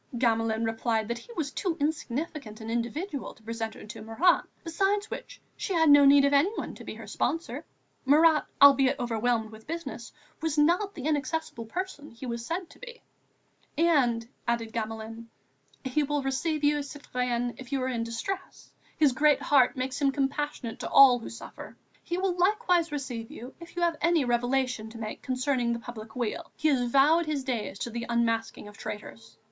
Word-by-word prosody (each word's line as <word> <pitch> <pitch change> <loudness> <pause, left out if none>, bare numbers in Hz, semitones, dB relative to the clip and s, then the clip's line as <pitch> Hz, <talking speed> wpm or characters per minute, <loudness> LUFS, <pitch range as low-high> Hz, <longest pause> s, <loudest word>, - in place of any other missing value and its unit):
Gamelin 225 -2 +1
replied 225 -1 0
that 235 0 -2
he 475 - -14
was 300 -9 -3
too 350 -1 -2
insignificant 290 -5 -3
an 225 0 -6
individual 265 - -3
to 220 - -23
present 225 0 -4
her - - -11
to 210 - -9
Marat, 225 +12 +3 0.2
besides 390 +5 0
which, - - -7 0.2
she 385 - -3
had 320 -3 +5
no 285 0 +8
need 280 0 +7
of 280 - +2
anyone 330 +10 +1
to - - -11
be - - -7
her - - -9
sponsor; 330 +1 -2 0.4
Marat, 305 +3 +5
albeit 275 -1 +7
overwhelmed 230 -1 0
with 220 0 -14
business, 335 +2 -6 0.3
was 320 -2 -1
not 350 +7 +3
the 270 - -6
inaccessible 300 -5 -2
person 350 0 -5
he 230 +3 -10
was 235 -1 -4
said 335 +7 -3
to - - -17
be, 485 -1 -11 0.7
and, 260 -9 +3 0.2
added 230 -1 -1
Gamelin: 225 0 -5 0.6
"He 265 +4 +1
will 290 -1 -1
receive 295 +3 -1
you, 295 0 +3
citoyenne, 250 -4 -3
if 255 -2 -10
you 275 - 0
are - - 0
in 240 -3 -1
distress; 300 +13 -5 0.2
his 300 -3 +5
great 295 +2 +4
heart 275 -1 +4
makes 255 +2 -3
him 275 -1 +4
compassionate 275 -3 -2
to - - -4
all 260 -3 +8
who 230 - -8
suffer. 230 - -10 0.2
He 345 - -3
will 370 -1 0
likewise 360 -3 +2
receive 255 -6 -4
you 250 +3 -9
if 340 0 -12
you 350 - -1
have 335 -2 +1
any 335 -3 +3
revelation 245 -1 0
to 230 - -11
make 215 -1 -6
concerning 255 -2 0
the - - -2
public 220 -2 -9
weal; 250 +7 -3
he 310 - +1
has 250 -4 +1
vowed 305 +6 +4
his 295 -3 -1
days 240 -6 -3
to 235 - -4
the 235 +1 -4
unmasking 230 -2 0
of 210 - -12
traitors." 115 - -8
265 Hz, 185 wpm, -28 LUFS, 230-310 Hz, 0.7 s, no